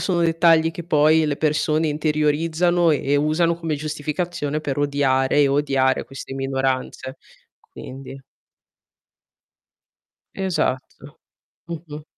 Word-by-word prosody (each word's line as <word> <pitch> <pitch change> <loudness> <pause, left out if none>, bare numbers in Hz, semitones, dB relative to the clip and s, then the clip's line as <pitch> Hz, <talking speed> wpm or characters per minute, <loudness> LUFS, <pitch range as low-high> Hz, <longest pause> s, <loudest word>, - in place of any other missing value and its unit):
sono 180 -3 0
dettagli 165 -1 +3
che 170 +1 -8
poi 155 -1 +3
le 145 -2 -1
persone 155 +1 +1
interiorizzano 155 +3 +1
e 150 - 0
e 145 - +4
usano 155 +3 +2
come 165 -2 -3
giustificazione 155 +1 -3
per 145 -2 -3
odiare 140 -1 +2
e 140 - +4
odiare 135 -2 +1
queste 135 0 -9
minoranze. 135 -1 -2 0.4
Quindi 135 +1 -11 2.1
Esatto. 185 -9 -3 0.5
Mh-mh. 155 -3 -8
150 Hz, 105 wpm, -22 LUFS, 140-165 Hz, 2.1 s, e